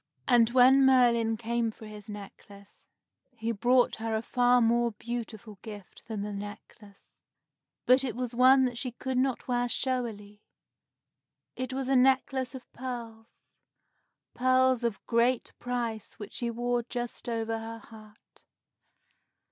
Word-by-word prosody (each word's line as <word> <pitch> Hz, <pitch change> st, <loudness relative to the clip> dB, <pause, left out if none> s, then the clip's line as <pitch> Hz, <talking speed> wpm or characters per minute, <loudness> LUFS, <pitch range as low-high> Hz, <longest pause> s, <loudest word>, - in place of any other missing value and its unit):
And 235 Hz, -3 st, +5 dB
when 260 Hz, +2 st, +6 dB
Merlin 235 Hz, -4 st, +4 dB
came 235 Hz, +1 st, -1 dB
for 220 Hz, 0 st, -11 dB
his 210 Hz, -1 st, -11 dB
necklace, 200 Hz, 0 st, -12 dB, 0.5 s
he 225 Hz, +1 st, -2 dB
brought 245 Hz, +3 st, +2 dB
her 225 Hz, 0 st, -2 dB
a 220 Hz, -, -2 dB
far 245 Hz, +1 st, +3 dB
more 235 Hz, 0 st, +2 dB
beautiful 225 Hz, -3 st, -7 dB
gift 205 Hz, -4 st, -11 dB
than 215 Hz, -3 st, -4 dB
the 210 Hz, 0 st, -5 dB
necklace, 205 Hz, 0 st, -11 dB, 0.7 s
but 255 Hz, +2 st, +5 dB
it 245 Hz, -5 st, -3 dB
was 250 Hz, -1 st, -4 dB
one 260 Hz, +2 st, +6 dB
that 245 Hz, -2 st, -3 dB
she 250 Hz, -3 st, -4 dB
could 260 Hz, +1 st, -2 dB
not 260 Hz, -1 st, -1 dB
wear 245 Hz, -1 st, 0 dB
showily. 220 Hz, -6 st, -3 dB, 1.1 s
It 255 Hz, 0 st, -4 dB
was 265 Hz, 0 st, -3 dB
a 270 Hz, -, +2 dB
necklace 260 Hz, 0 st, +2 dB
of 255 Hz, -, -8 dB
pearls, 235 Hz, -3 st, -9 dB, 0.8 s
pearls 255 Hz, 0 st, +3 dB
of 230 Hz, -4 st, -2 dB
great 235 Hz, +1 st, +1 dB
price 240 Hz, -3 st, -4 dB
which 210 Hz, -3 st, -9 dB
she 240 Hz, -, -2 dB
wore 240 Hz, +1 st, -1 dB
just 240 Hz, 0 st, -5 dB
over 225 Hz, -1 st, -2 dB
her 225 Hz, 0 st, -7 dB
heart. 215 Hz, -2 st, -17 dB
235 Hz, 140 wpm, -29 LUFS, 220-250 Hz, 1.1 s, when